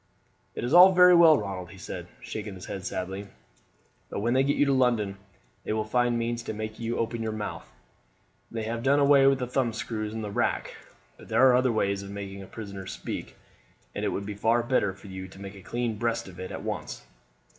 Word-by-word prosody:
"It's 120 +5 -2
all 180 +2 +9
very 180 0 +8
well, 165 -3 +8
Ronald," 95 -5 -5
he - - -12
said, - - -7 0.2
shaking 105 -2 -6
his 95 - -9
head 95 - -6
sadly; 95 +2 -4 0.8
"but - - -4
when 120 +4 +1
they 130 - +4
get 140 +1 +2
you 145 - +4
to 140 - +2
London 120 -6 +2 0.5
they - - -2
will 110 0 0
find 120 +2 +1
means 115 0 -2
to 115 - -5
make 110 0 -5
you 115 0 -2
open 115 0 -2
your 110 -1 -2
mouth. 110 -1 -6 0.8
They 115 -1 -4
have 115 +1 -3
done 135 +3 +3
away 140 -1 +6
with 135 0 +4
the 125 - -2
thumb 125 -2 0
screws 110 -2 -4
and 110 - -4
the 105 - -4
rack, - - -1 0.4
but - - -14
there 130 - +5
are 125 - +6
other 130 0 +3
ways 100 -3 0
of 100 - -9
making 100 -1 -7
a 95 - -10
prisoner 100 -4 -8
speak, - - -6 0.6
and - - -4
it - - +1
would 100 - -3
be 105 - -4
far 115 +4 +2
better 120 -5 +1
for 95 +2 -16
you 95 -1 -7
to 95 - -14
make 100 0 -8
a 100 - -12
clean 115 +1 -3
breast 115 -2 -1
of 95 -1 -12
it 95 - -5
at - - -6
once. - - -5
110 Hz, 225 wpm, -27 LUFS, 100-125 Hz, 0.8 s, all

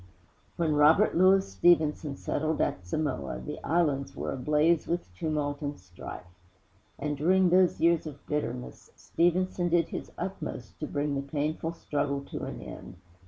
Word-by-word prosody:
VII - - -21 0.5
When 165 -3 +1
Robert 160 +8 +5
Louis 190 +2 +5
Stevenson 150 - +2
settled 155 +1 -1
at 90 -1 -1
Samoa, 90 - -2
the 65 - -7
islands 150 -5 0
were - - -3
ablaze 150 +5 +2
with 170 - -3
tumult 145 - -2
and 145 0 -3
strife. 90 0 -9 0.7
And, 150 +1 -2
during 180 +5 +3
those 185 0 +4
years 170 -1 +3
of 145 -2 -10
bitterness, 65 - -4
Stevenson 175 +1 +1
did 170 0 +2
his - - -6
utmost 170 - -6
to 150 - -3
bring 145 0 -1
the 140 - -1
painful 155 +3 -2
struggle 145 -3 -2
to - - -4
an - - -7
end. - - -9
150 Hz, 155 wpm, -29 LUFS, 140-170 Hz, 0.7 s, Robert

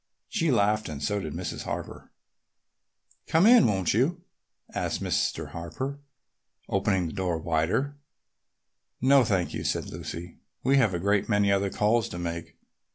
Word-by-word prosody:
She 165 -7 0
laughed 105 - +2
and 75 -2 -5
so 105 +6 -1
did 80 -6 -5
Mrs. 90 0 -4
Harper. - - -6 1.2
"Come 165 +4 +4
in, 235 0 +7
won't 95 -4 +1
you?" 160 - +1 0.5
asked - - -2
Mr. - - -1
Harper, 130 - -5 0.7
opening 95 -2 +1
the 80 - -5
door 90 -4 -1
wider. 85 - 0 1.0
"No, 135 +1 +5
thank 95 -6 0
you," - - -4
said - - -2
Lucy. 85 +1 -7 0.2
"We 135 +2 +4
have 110 -9 +3
a - - -1
great 100 +4 +1
many 105 -2 +3
other 100 0 +2
calls 110 +3 +1
to - - -6
make. 85 -1 -5
100 Hz, 150 wpm, -27 LUFS, 85-130 Hz, 1.2 s, in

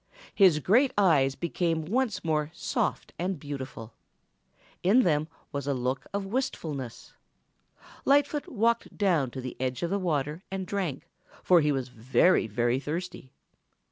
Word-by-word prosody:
His 185 -6 +5
great 230 - +3
eyes 145 -9 +4
became 165 -1 -1
once 220 0 0
more 155 -2 0
soft - - -2
and 180 -1 -2
beautiful. 130 -6 -7 0.9
In 220 +8 +5
them 155 -2 +1 0.2
was 140 -1 -4
a 140 - +1
look 130 +2 -2
of 200 0 -2
wistfulness. 155 - -4 0.9
Lightfoot 285 +1 +2
walked 230 0 0
down 175 -10 +2
to 130 +2 -7
the 125 -1 -6
edge 130 +3 -2
of 170 - -1
the 200 - +1
water 150 -2 -1
and 195 -1 -4
drank, 175 -6 -3 0.4
for 180 -2 +5
he 150 0 +2
was 130 -2 -2
very, 125 +6 +3
very 120 +4 +1
thirsty. 155 -2 -5
160 Hz, 140 wpm, -28 LUFS, 135-195 Hz, 0.9 s, His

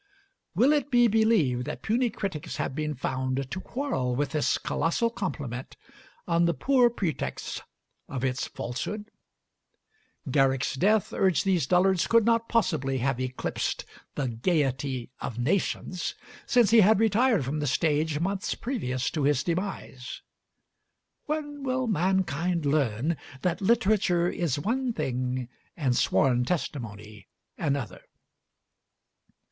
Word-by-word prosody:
Will 255 - +5
it 290 -1 0
be 240 -2 +5
believed 215 - +2
that 150 - -6
puny 240 +3 +1
critics 195 -8 -4
have - - -2
been 150 +1 -2
found 130 +1 -2
to 190 - -3
quarrel 235 - -2
with 145 +2 0
this 155 -2 +1
colossal 170 +10 0
compliment 140 - -5 0.5
on 170 0 +3
the 170 -1 +1
poor 250 - +4
pretext 185 -9 -3 0.5
of 130 -2 -4
its 130 0 -1
falsehood? 210 - -5 1.2
Garrick's 135 -1 +2
death, 200 +9 +2
urge 185 -5 +2
these 180 -8 +1
dullards, 180 +1 +3
could 230 -2 +4
not 230 0 +2
possibly 155 - +1
have 130 0 0
eclipsed 130 0 -2 0.3
the 140 -3 -1
gayety 130 -1 -1
of 115 - -5
nations, 175 +5 -1 0.3
since 240 -4 +4
he 230 - +7
had 210 0 +6
retired 225 - +3
from 145 +4 -2
the 145 - -1
stage 150 +2 +1
months 190 +3 -1
previous 130 - -2
to 155 - -2
his 140 -1 +2
demise. 170 -8 -4 1.0
When 295 -1 -3
will 260 -1 0
mankind 180 - 0
learn 140 +1 +1 0.3
that 180 +1 0
literature 200 -5 +3
is 170 -6 -1
one 240 - -1
thing, 125 - -2 0.3
and 135 -6 +1
sworn 125 -1 +3
testimony 110 - -4 0.3
another? 140 -8 -2
165 Hz, 125 wpm, -27 LUFS, 130-215 Hz, 1.2 s, he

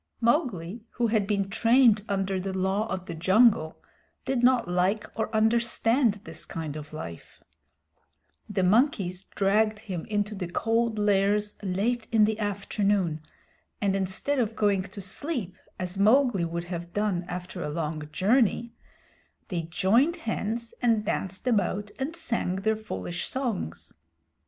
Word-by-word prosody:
Mowgli, 235 - 0
who 240 - 0
had 215 -3 +1
been 200 -2 0
trained 230 +1 +4
under 195 -1 0
the 190 0 -3
Law 190 +4 0
of 185 -1 -3
the - - -6
Jungle, 190 -1 +3 0.5
did 265 -2 0
not 245 -3 +4
like 180 +4 +1
or 220 -1 -2
understand 230 +1 +2
this 160 -1 -7
kind 160 -3 -5
of 150 -1 -8
life. 85 - -9 1.1
The 200 -2 0
monkeys 195 - +2
dragged 210 +2 +2
him 190 -5 -6
into 210 0 -1
the 190 -3 -4
Cold 225 +4 0
Lairs 205 0 +2
late 210 +5 -1
in 220 -2 +5
the 220 0 -1
afternoon, 200 -5 0 0.6
and 195 -2 +1
instead 195 +9 -1
of 225 -2 0
going 205 -2 +2
to 200 - -8
sleep, 215 - -3 0.2
as 185 +1 -4
Mowgli 220 -3 +4
would 170 +1 -3
have 175 -1 -6
done 205 -4 0
after 180 0 -6
a - - -3
long 155 -1 -3
journey, 230 +3 +2 0.8
they 175 -3 -1
joined 210 - +2
hands 225 +1 -2
and 225 -3 +2
danced 190 -2 -2
about 205 -3 0
and 285 +5 -3
sang 230 - -1
their 220 +3 +1
foolish 90 - -5
songs. 235 - -4
205 Hz, 140 wpm, -27 LUFS, 185-230 Hz, 1.1 s, in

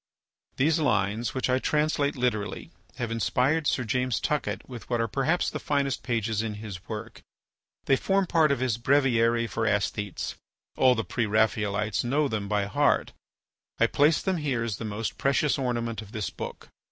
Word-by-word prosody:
These 155 +4 +2
lines, 110 -4 0
which 130 - 0
I 130 0 +2
translate 150 0 +1
literally, 120 -5 -2 0.2
have 120 -2 -3
inspired 130 +8 +1
Sir 130 - +1
James 125 +1 0
Tuckett 150 -1 -2
with 120 -4 -9
what 120 -1 0
are 115 - +1
perhaps 140 - +1
the - - -4
finest 140 -2 0
pages 115 -3 -1
in 110 -2 -3
his 105 -3 -8
work. 110 +1 -6 0.6
They 135 - +4
form 195 +4 +1
part 160 -4 +3
of 140 - 0
his 120 -3 0
"Breviary 120 -3 +3
for 115 0 -2
Æsthetes"; 100 0 -1 0.4
all 130 -1 +5
the 115 - -2
Pre 120 -3 -1
Raphaelites 105 0 +1
know 140 +5 +1
them 105 -5 -3
by 105 -1 +1
heart. 100 - +1 0.6
I - - +4
place 150 +3 +3
them 190 -2 0
here 135 -7 -1
as 110 -4 -3
the 115 - -5
most 105 +1 -4
precious 140 +1 +2
ornament 120 -3 -2
of 105 -1 -13
this 110 -2 -3
book. - - -8
120 Hz, 175 wpm, -27 LUFS, 110-140 Hz, 0.6 s, all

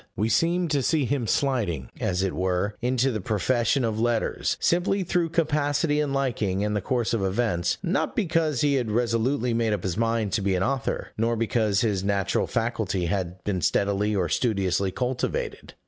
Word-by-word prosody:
We 105 +4 0
seem 175 +6 +2
to 145 -2 +1
see 150 +2 +1
him 125 -2 -1
sliding, 110 - 0
as 90 0 0
it 95 - -1
were, 95 +2 0
into 130 +2 +1
the 110 -4 -3
profession 120 +6 +1
of 110 -1 -2
letters, 115 -1 0
simply 185 +3 +1
through 175 -1 0
capacity 150 -2 +1
and 150 -2 0
liking, 115 -8 0
and 105 0 -1
the 105 - 0
course 120 0 -1
of 115 - 0
events 95 -3 0
not 185 +1 0
because 165 - +1
he 145 -1 +3
had 125 -5 0
resolutely 120 +2 +1
made 115 -2 +1
up 100 - -3
his 95 -1 -2
mind 115 -2 0
to 110 - +1
be 95 -1 +1
an 90 - +1
author, 135 +1 -2
nor 115 +1 +1
because 110 -2 +1
his 105 -5 0
natural 100 -1 0
faculty 110 -6 -1
had 90 0 -3
been 95 -3 -1
steadily 100 +5 +1
or 90 -3 +1
studiously 95 -2 0
cultivated. 125 +5 -3
115 Hz, 180 wpm, -25 LUFS, 100-135 Hz, -, he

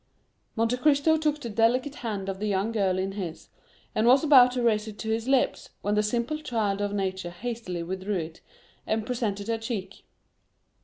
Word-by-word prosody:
Monte 230 +2 +1
Cristo 295 +3 +4
took 305 -1 0
the 240 -5 -6
delicate 245 +6 +2
hand 205 -5 -4
of 190 -1 -4
the 215 - -2
young 200 +2 0
girl 195 -4 +1
in 190 +1 -1
his, 185 -5 -6 0.4
and 220 +2 +2
was 260 +4 +6
about 265 -5 +7
to 250 -1 -1
raise 220 -2 +2
it 210 -1 -8
to 220 0 -3
his 225 +2 -1
lips, 270 -1 +1
when 205 - 0
the 210 - +3
simple 235 +8 -1
child 215 -8 -1
of 205 0 -1
nature 190 -3 -2
hastily 185 -2 -5
withdrew 190 +4 -3
it, 160 -1 -6 0.5
and 220 0 0
presented 215 -4 -2
her 230 -1 -1
cheek. 225 -4 -5
220 Hz, 190 wpm, -27 LUFS, 195-245 Hz, 0.5 s, about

